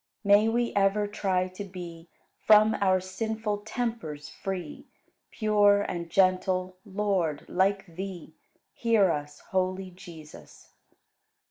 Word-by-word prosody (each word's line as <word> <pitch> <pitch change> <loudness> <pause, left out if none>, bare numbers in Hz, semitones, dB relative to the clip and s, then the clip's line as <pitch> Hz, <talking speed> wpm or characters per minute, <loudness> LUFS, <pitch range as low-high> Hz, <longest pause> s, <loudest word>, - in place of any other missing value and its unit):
May 205 +2 +5
we 235 +1 0
ever 200 +1 +2
try 190 -3 -1
to 185 +3 -7
be 175 -3 -9 0.3
From 215 0 +6
our 185 -1 +3
sinful 210 +3 -3
tempers 210 -10 -4
free, 185 -5 -6 0.4
Pure 205 -2 +3
and 170 -3 -4
gentle, 185 0 +1
Lord, 190 -7 -1
like 195 +1 +1
Thee; 175 -2 -8 0.4
Hear 220 -6 +3
us, 145 -1 -5
holy 185 0 -1
Jesus! 165 -4 -13
190 Hz, 110 wpm, -27 LUFS, 180-205 Hz, 0.4 s, From